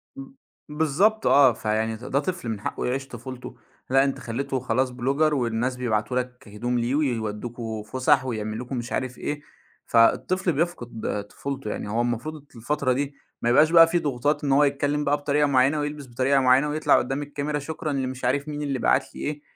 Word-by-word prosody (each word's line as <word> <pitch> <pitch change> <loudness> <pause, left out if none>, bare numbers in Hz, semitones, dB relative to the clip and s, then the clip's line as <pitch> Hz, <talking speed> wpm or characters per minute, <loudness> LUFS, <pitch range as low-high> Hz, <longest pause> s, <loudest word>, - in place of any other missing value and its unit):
م 275 - -7 0.4
بالضبط، 160 +9 +2
آه، 135 -3 +6
فيعني 110 0 -1
د 120 - -11
ده 140 - +1
طفل 175 -3 -3
من 110 -3 -3
حقّه - - -3
يعيش 135 +2 -2
طُفولته، 125 +1 -8 0.3
لأ 135 +1 +5
أنت 135 -1 -1
خلّيته 130 +3 -3
خلاص 130 +1 0
blogger، 140 +5 +1
والناس 120 -1 0
بيبعتوا 120 -1 -1
لك 125 -2 -7
هدوم 120 +4 -2
ليه، 120 +4 0
ويودّوكم 115 -4 -2
فسح، 130 +5 +2
ويعملوا 110 -1 -3
لكم 125 +1 -4
مش 120 0 -5
عارف 130 -1 -2
إيه، 145 0 -4 0.4
فالطفل 180 +11 +3
بيفقد 125 -10 -2
طُفولته، 135 -2 -5
يعني - - -5
هو 115 +3 0
المفروض 125 +6 -3
الفترة 130 +2 0
دي 140 +2 -3 0.3
ما 120 - +1
يبقاش 150 +6 +5
بقى 165 -1 +8
في 175 +1 +1
ضغوطات 145 +1 -1
إن 140 - 0
هو 140 +2 +5
يتكلّم 145 +1 +1
بقى 145 0 +2
بطريقة 145 0 +1
معيّنة، 135 +2 +3
ويلبس 145 -1 -4
بطريقة 130 +3 +2
معيّنة، 130 +3 +4
ويطلع 155 +1 +3
قدّام 135 +3 -1
الكاميرا 145 +1 -3
شكرًا 155 +1 -4
لمش 130 -2 -3
عارف 140 +4 0
مين 150 -1 -4
اللي 140 -3 -2
بَعت - - +1
لي - - -8
إيه، 145 0 -3
135 Hz, 185 wpm, -25 LUFS, 120-145 Hz, 0.4 s, بقى